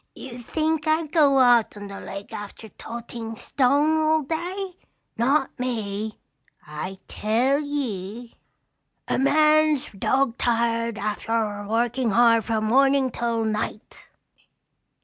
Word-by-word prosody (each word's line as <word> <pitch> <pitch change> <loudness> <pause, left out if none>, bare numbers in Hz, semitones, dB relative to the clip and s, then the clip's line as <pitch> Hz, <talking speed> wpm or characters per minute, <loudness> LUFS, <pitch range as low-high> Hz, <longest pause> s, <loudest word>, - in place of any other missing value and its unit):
"You 250 -2 -9
think 310 +5 -1
I'd 310 -1 +1
go 290 -5 +4
out 245 -4 +4
on 205 - -8
the 200 - -8
lake 200 +1 -8
after 205 +2 -8
toting 230 +1 -7
stone 285 +7 +2
all 315 0 +2
day? 360 +5 -4 0.4
Not 270 +5 +2
me! 220 -4 -3 0.5
I 155 +6 -6
tell 245 +7 +1
ye, 240 -6 -4 0.7
a - - 0
man's 305 +1 +3
dog 250 +5 0
tired 230 -1 0
arfter 210 0 -2
workin' 235 +2 0
hard 230 0 +4
from 220 -2 -1
mornin' 270 +2 +3
till 230 -1 -1
night. 215 0 -4
240 Hz, 115 wpm, -24 LUFS, 220-285 Hz, 0.7 s, go